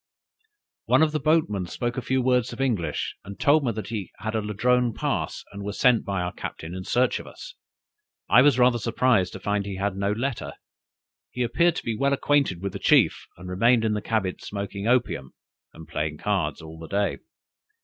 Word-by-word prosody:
"One - - +4
of 155 - +2
the 155 - -1
boatmen 140 - +1
spoke 120 +6 -3
a 130 - -2
few 130 +2 0
words 125 -1 +2
of - - -9
English, 105 - -1
and 100 0 -10
told 145 +1 +4
me 120 - +1
he 105 -3 -5
had 110 +3 -4
a 110 - 0
Ladrone 120 +3 +1
pass, - - -2
and 100 0 -8
was 100 +1 -5
sent 125 -3 +4
by 95 -2 -2
our 90 - -3
captain 80 +2 -7
in 95 0 -5
search 125 +1 +1
of - - -10
us; - - -10 0.7
I 125 - +7
was 140 -2 +5
rather 125 -1 +4
surprised 115 -4 +2
to 95 - -7
find 105 +1 -1
he 100 - -4
had 100 0 -2
no 100 +1 0
letter. 120 +4 -3 0.8
He 125 - -2
appeared 170 +7 +2
to - - -5
be 115 - -1
well 140 +5 +1
acquainted 140 -10 +1
with 100 - -3
the - - -5
chief, - - +3
and 90 +1 -10
remained 115 +5 +3
in 110 - +1
his 105 - -3
cabin 105 -5 -1
smoking 100 0 -5
opium, 105 - 0 0.4
and 80 0 -13
playing 75 0 -3
cards 85 -6 -1
all 80 0 -10
the 80 - -8
day. 100 +3 -1
105 Hz, 200 wpm, -25 LUFS, 95-125 Hz, 0.8 s, I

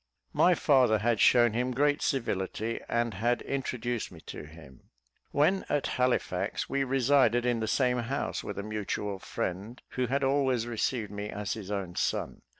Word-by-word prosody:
My 180 0 +5
father 130 -9 +4
had 115 +1 +1
shown 120 -3 +5
him 125 +2 -1
great 145 +2 +2
civility, 115 -3 -1
and 120 -1 0
had 120 +5 0
introduced 120 -4 -3
me 85 - -12
to - - -8
him. 75 -5 -15 0.4
When 170 +7 +2
at 145 - +1
Halifax, 125 -1 0
we 140 0 0
resided 130 -2 +3
in 120 -2 +1
the 110 - -2
same 125 +1 +2
house 115 - -2
with - - -6
a 100 - -3
mutual 105 -1 -3
friend, 100 +9 -4
who 130 -1 -1
had 135 +3 0
always 135 -3 +2
received 115 -2 -2
me 105 0 -5
as 105 -1 -3
his 105 -3 -7
own 95 -4 -3
son. - - -1
120 Hz, 165 wpm, -29 LUFS, 105-130 Hz, 0.4 s, My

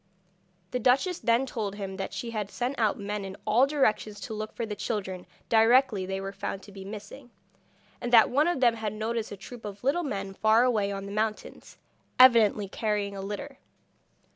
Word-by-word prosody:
The 250 - -1
duchess 270 - +2
then 235 +2 +2
told 215 -6 -4
him 195 -2 -6
that 195 - -4
she 235 - -5
had 210 -3 -3
sent 250 +5 -3
out 215 -3 +2
men 205 0 -4
in 195 0 -7
all 230 +5 +4
directions 220 -7 0
to 225 - -6
look 215 0 -5
for 235 - -4
the 210 -1 -5
children 190 -4 -4 0.2
directly 225 -3 +4
they 190 0 -3
were 195 0 -5
found 195 0 -5
to 205 - -13
be 195 -1 -9
missing, 215 +6 -9 0.7
and 240 0 -3
that 230 -2 +7
one 290 +5 +3
of 345 -6 0
them 240 -2 +5
had 215 -2 -3
noticed 220 +1 -3
a 205 - -7
troop 235 +4 -11
of 205 0 -8
little 280 +7 +2
men 195 - -4
far 220 +4 +4
away 215 -5 +1
on 195 0 -5
the 200 - -7
mountains, 215 +1 -4 0.4
evidently 225 -5 +6
carrying 205 0 -2
a 195 - -5
litter. 210 +8 -6
215 Hz, 195 wpm, -28 LUFS, 200-245 Hz, 0.7 s, that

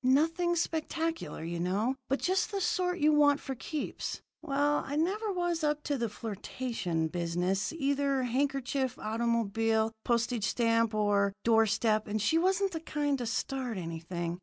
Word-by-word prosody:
Nothing 330 +7 +3
spectacular, 325 - -2
you 170 +1 -3
know, 200 +8 +1 0.2
but 270 - +2
just 375 +2 +1
the 400 -2 -2
sort 360 -1 0
you 305 -2 +4
want 290 -1 +5
for 270 - -5
keeps. 295 +4 -4 0.2
Well, 290 -1 +1
I 285 - -4
never 400 +7 0
was 350 -3 -1
up 300 0 0
to 290 - -1
the 235 -1 0
flirtation 205 -5 -3
business, 175 +4 -1
either 280 -3 0
handkerchief, 265 0 0
automobile, 225 0 +1
postage 235 -2 +1
stamp, 230 0 +2
or 205 -1 +2
door 225 -1 +5
step, 215 0 +1
and 215 +1 -1
she 215 +11 +3
wasn't 380 +2 +2
the 325 - -3
kind 295 -3 -1
to 240 - -3
start 250 -1 -2
anything. 170 0 -4
255 Hz, 155 wpm, -30 LUFS, 215-305 Hz, 0.2 s, want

